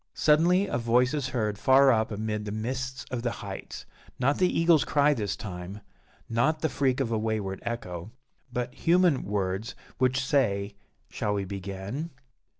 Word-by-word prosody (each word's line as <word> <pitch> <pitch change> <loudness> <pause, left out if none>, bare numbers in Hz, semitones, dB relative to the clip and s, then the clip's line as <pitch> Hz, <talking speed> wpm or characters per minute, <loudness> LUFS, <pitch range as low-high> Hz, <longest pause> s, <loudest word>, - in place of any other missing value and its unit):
Suddenly 170 +6 +4
a 120 - -2
voice 120 +3 +2
is 145 -4 -1
heard 110 -5 -2
far 135 +2 +6
up 110 -2 +2
amid 105 0 -3
the 105 - -4
mists 130 +4 -4
of 125 -2 -2
the 120 - 0 0.2
heights 95 -1 -7 0.3
not 135 +3 +1
the 180 -1 +4
eagle's 165 -2 +4
cry 145 0 +3
this 105 -7 -2
time 95 +1 -7 0.5
not 145 +8 +1
the 160 - +1
freak 135 -2 +1
of 125 -4 -1
a 110 - +1
wayward 105 -3 -2
echo 105 -6 -5 0.4
but 125 0 -3
human 175 -3 +3
words, 100 +1 -2 0.2
which 130 +1 +2
say 100 -8 +1 0.4
"_Shall 105 0 -1
we 100 -1 -2
begin? 100 - -5
120 Hz, 160 wpm, -27 LUFS, 105-140 Hz, 0.5 s, far